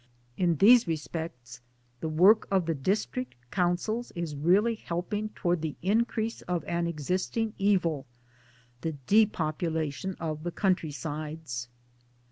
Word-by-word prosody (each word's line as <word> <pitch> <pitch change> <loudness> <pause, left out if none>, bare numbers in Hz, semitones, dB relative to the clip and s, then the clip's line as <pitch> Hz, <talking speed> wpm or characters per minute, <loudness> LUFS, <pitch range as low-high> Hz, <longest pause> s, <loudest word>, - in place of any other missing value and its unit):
In 175 0 +2
these 230 - +7
respects 155 -6 -5 0.4
the 160 - -3
work 185 +8 +5
of 190 -3 +2
the 165 - 0
District 200 - -2 0.2
Councils 190 +6 0
is 170 -3 -3
really 190 +10 +3
helping 210 +2 -3
towards 175 -5 -1
the 160 -2 -3
increase 225 +2 0
of 175 -1 -2
an 170 0 -1
existing 185 - -1
evil, 175 -8 +1 0.7
the 160 - -2
depopulation 160 -4 +1
of 155 -2 -4
the 175 - -2
country 180 -2 +1
sides. 150 -4 -5
170 Hz, 120 wpm, -29 LUFS, 155-200 Hz, 0.7 s, these